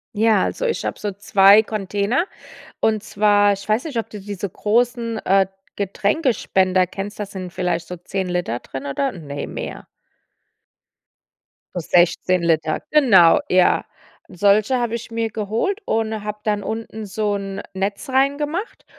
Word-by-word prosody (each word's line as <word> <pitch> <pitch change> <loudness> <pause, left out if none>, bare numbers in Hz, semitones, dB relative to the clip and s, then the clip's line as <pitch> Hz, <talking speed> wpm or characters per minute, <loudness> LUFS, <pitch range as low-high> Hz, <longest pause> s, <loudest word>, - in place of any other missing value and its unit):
Ja, 220 -2 +3
also, - - -3
ich 460 - -1
habe - - -3
so 205 -1 -3
2 200 +1 +5
Container. 210 - -1 0.6
Und 215 -1 +1
zwar 205 -1 +3
ich 200 +1 -8
weiß 215 +6 +1
nicht, 290 -7 -4
ob 230 - -2
du 210 - -8
diese 200 -1 -5
großen, 230 +3 0
äh, 195 0 +4 0.3
Getränkespender 200 - +1
kennst. 200 +3 -6
Da 210 - -2
sind 190 -3 -7
vielleicht 180 -2 -2
so 180 - -6
10 190 +2 -4
Liter 175 -10 -2
drinnen, 135 +1 -7
oder? 270 - -1
Ne, 145 -5 -6
mehr. - - -7 1.9
So 180 - -1
16 175 +1 +2
Liter, 160 -2 +1
genau, 205 - +6
ja. 185 -1 +4 0.5
Solche 205 +6 +3
habe 235 -1 -1
ich 235 0 -7
mir 230 -1 -2
geholt 225 - -2
und 220 -1 -1
habe 210 0 -5
dann 210 -1 0
unten 220 0 -5
so 205 +1 -1
'n 195 -1 -5
Netz 200 +8 -3
reingemacht 290 - -1
205 Hz, 150 wpm, -21 LUFS, 190-225 Hz, 1.9 s, genau